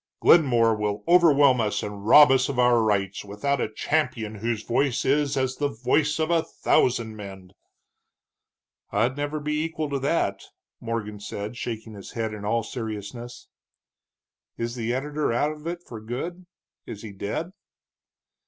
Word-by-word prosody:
"Glenmore 120 -8 +5
will 105 -1 -2
overwhelm 145 -7 +5
us 105 -2 -1
and 105 0 -6
rob 150 +3 +9
us 130 0 +3
of 140 - -3
our 125 -1 +4
rights, 100 -3 0
without 115 +8 -2
a 110 - -2
champion 115 -4 -1
whose 110 +1 -3
voice 125 +2 0
is 140 +1 +1
as 130 0 -1
the 145 - +1
voice 140 +5 0
of 160 +1 0
a 165 -1 +4
thousand 115 -7 +1
men." 95 -3 -10 1.4
"I'd 115 +6 +1
never 145 +1 -3
be 150 +1 -1
equal 160 -2 -3
to 140 - -1
that," 130 -9 0 0.4
Morgan 105 -3 -4
said, 105 +2 -6
shaking 110 -2 -5
his 100 -2 -10
head 110 -2 -2
in 105 -1 -7
all 115 +2 0
seriousness. 115 +1 -7 1.1
"Is 115 0 -3
the 120 -1 -3
editor 145 +3 -1
out 145 +6 +1
of 155 +1 -9
it 175 +1 -4
for 115 -3 -9
good? 170 +11 -6 0.4
Is 105 - -8
he 110 - -7
dead?" 105 - -4
120 Hz, 155 wpm, -25 LUFS, 105-145 Hz, 1.4 s, rob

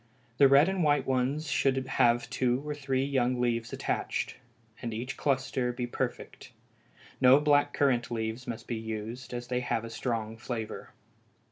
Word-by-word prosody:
The 140 - +8
red 140 +4 +6
and 190 -2 0
white 145 -3 +3
ones 135 +4 0
should 135 -1 +1
have 120 -3 +3
two 130 +3 0
or 150 - -1
three 135 -2 -1
young 130 -3 +1
leaves 115 -1 0
attached, - - -2 0.4
and 115 -3 -4
each 125 +4 -4
cluster 130 -2 0
be 120 0 -3
perfect; 120 - -5 0.7
no 130 +2 +7
black 145 -1 +3
currant 125 -5 +1
leaves 115 +1 -3
must 115 -1 -5
be 120 - -2
used, 110 +3 -6
as 120 0 -4
they 125 0 0
have 120 -2 -2
a 115 - -8
strong 115 -2 -3
flavor. 110 -1 -5
125 Hz, 160 wpm, -29 LUFS, 120-135 Hz, 0.7 s, The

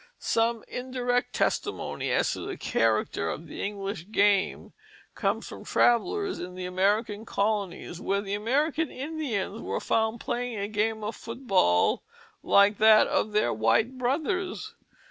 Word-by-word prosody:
Some 230 0 0
indirect 250 0 -1
testimony 410 - -1
as - - +2
to - - -6
the 395 - -5
character 110 -7 0
of 155 - -5
the - - -8
English 200 -3 -4
game 205 -2 +2 0.4
comes - - -1
from - - -9
travellers 380 - +2
in 180 +1 -7
the 185 0 -5
American 205 +4 0
colonies, 200 -5 -2
where 200 0 0
the 200 -1 -5
American 285 +9 0
Indians 260 -8 -3
were - - -2
found 220 +1 0
playing 245 -1 -3
a 200 0 -2
game 215 +1 -1
of 210 +1 -3
foot 235 +4 -9
ball 90 - +3 0.4
like 200 +1 +4
that 215 0 +7
of 215 - 0
their 210 - +2
white 165 - +1
brothers. 360 - -1
220 Hz, 145 wpm, -27 LUFS, 200-250 Hz, 0.4 s, that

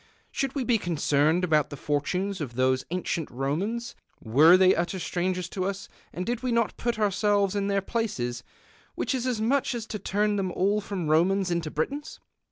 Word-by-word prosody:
Should 275 0 -2
we 275 - 0
be 235 -2 +2
concerned 160 -1 +1
about 155 -5 +2
the 145 - -7
fortunes 180 +8 -1
of 125 -5 -5
those 130 0 +2
ancient 175 -2 -2
Romans 185 - -2 0.3
were 150 +10 +6
they 185 0 +6
utter 175 +3 -1
strangers 180 +2 -2
to 185 0 -3
us 200 +1 -4 0.2
and 180 - -4
did 240 0 -2
we 255 -1 -1
not 230 -2 +1
put 240 -1 -2
ourselves 205 -1 +1
in 200 -1 0
their 200 0 +1
places, 125 - -2 0.5
which - - -1
is 260 -1 -1
as 245 -4 -1
much 255 +3 +1
as 230 -2 -4
to 210 - -5
turn 205 +2 0
them 190 -2 -1
all 200 +3 +1
from 195 -5 -4
Romans 180 +4 +2
into 170 -2 -1
Britons 280 - -4
190 Hz, 185 wpm, -27 LUFS, 160-215 Hz, 0.5 s, were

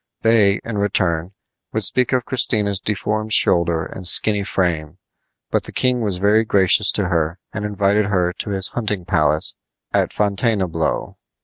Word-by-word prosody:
They, 110 -3 +3
in 110 -3 -5
return, 90 -3 -1 0.4
would - - -1
speak 125 -2 +3
of 125 -2 0
Christina's 105 -6 +1
deformed 110 +2 -2
shoulder 85 -2 +3
and 95 -2 -7
skinny 105 +3 +3
frame; 85 -6 -2 0.5
but - - -1
the - - -9
king 125 -1 0
was 100 -5 -1
very 105 +4 +2
gracious 100 -1 +3
to 100 -4 0
her 85 0 -1 0.2
and 105 - -4
invited 100 0 0
her 90 -3 0
to - - -7
his 95 -1 0
hunting 105 -6 -3
palace 75 -2 +1 0.4
at - - +1
Fontainebleau. 100 -5 -1
100 Hz, 150 wpm, -19 LUFS, 90-105 Hz, 0.5 s, They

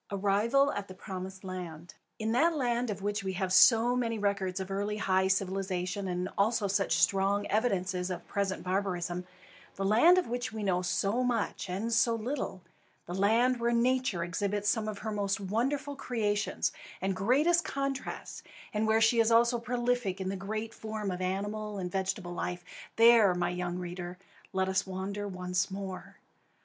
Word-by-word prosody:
ARRIVAL 205 +8 +2
AT 205 0 -4
THE 185 - -10
PROMISED 190 0 -7
LAND. 175 -3 -7 0.2
In 220 0 -2
that 320 +8 +3
land 245 -3 0
of 200 -2 -4
which 205 0 -1
we 190 -1 -2
have 185 0 -1
so 235 +4 +6
many 230 -2 0
records 200 -2 -1
of 190 0 -5
early 205 +2 -1
and 210 - -4
high 190 0 +3
civilisation, 190 0 -1
and 180 0 -2
also 210 0 +2
such 195 0 +1
strong 200 +1 +2
evidences 190 -4 0
of 180 - -5
present 200 -2 -2
barbarism, 180 -2 -2 0.5
the 195 - -2
land 240 - +6
of 365 - +2
which 245 0 -3
we 220 -1 -5
know 180 -2 +1
so 200 +6 0
much 230 -5 -1
and 210 +6 -2
so 230 +1 +3
little, 225 -5 -4 0.4
the 175 - -6
land 230 +6 +3
where 235 0 +1
Nature 240 -6 +1
exhibits 200 +4 -2
some 215 0 +1
of 215 -2 -4
her 220 +2 -4
most 205 -1 -1
wonderful 265 +9 -1
creations 210 -6 -1 0.3
and 190 0 -1
greatest 290 - +3
contrasts, 275 0 -4 0.3
and 215 +1 0
where 220 +1 +3
she 225 +1 +4
is 225 0 +4
also 235 +1 +4
prolific 240 -4 -1
in 190 0 -2
the 195 - -2
great 215 +4 -4
forms 215 -2 -4
of 180 - -5
animal 205 +3 -3
and 180 -2 -4
vegetable 190 -2 -2
life, 175 0 -4 0.3
there, 225 -5 +6
my 175 0 0
young 180 0 -3
reader, 180 0 -6 0.3
let 190 -1 0
us 190 0 0
wander 195 +2 -4
once 180 0 -1
more. 190 -1 -7
200 Hz, 175 wpm, -30 LUFS, 190-230 Hz, 0.5 s, so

